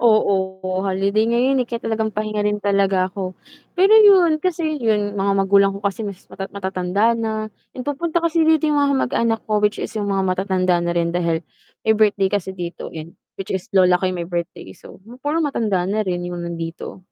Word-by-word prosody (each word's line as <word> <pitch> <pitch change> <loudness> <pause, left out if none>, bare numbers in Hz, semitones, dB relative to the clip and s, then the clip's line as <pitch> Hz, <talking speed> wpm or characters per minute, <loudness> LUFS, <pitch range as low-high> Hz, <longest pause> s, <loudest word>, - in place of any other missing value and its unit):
Oo, 190 -4 +1
holiday 195 +3 +1
ngayon, 255 +3 +2
eh, - - -8
kaya 235 -1 -4
talagang 220 -1 -1
pahinga 215 0 -2
rin 210 0 -1
talaga 195 -2 +2
ako. 185 -1 -5 0.4
Pero 385 +4 +5
yun, 370 -7 +6
kasi 320 -4 -1
yung 210 -2 0
mga 200 +1 +1
magulang 200 0 +4
ko 200 - -11
kasi 200 +2 -2
mas 195 -2 -8
mata 195 - -6
matatanda 190 +2 0
na, 220 -1 -3 0.3
yung 250 - -5
pagpunta 330 +4 -1
kasi 330 -1 +2
dito 320 0 +3
yung 295 - +2
mga 280 -1 +2 0.2
mag-anak 225 -1 0
ko 215 -1 0
which 210 0 +1
is - - -4
yung 205 -1 -2
mga 195 -1 0
matatanda 185 -1 +1
na 175 0 -1
rin 170 0 +1
dahil 170 -2 0 0.4
may 220 0 +4
birthday 205 -3 +3
kasi 195 -2 -1
dito, 175 -1 -6
yun. 160 +1 -8 0.3
Which 195 - -6
is 190 +1 -4
lola 180 -1 +5
ko 190 - 0
yung 180 - -5
may 170 - -7
birthday 170 - -5
so, - - -15
yung 240 +3 -13
puro 295 +4 -1
matanda 220 -10 0
na 205 +3 0
rin 175 -1 -2
yung 175 -1 -5
nandito. 170 +1 -6
200 Hz, 205 wpm, -20 LUFS, 185-230 Hz, 0.4 s, yun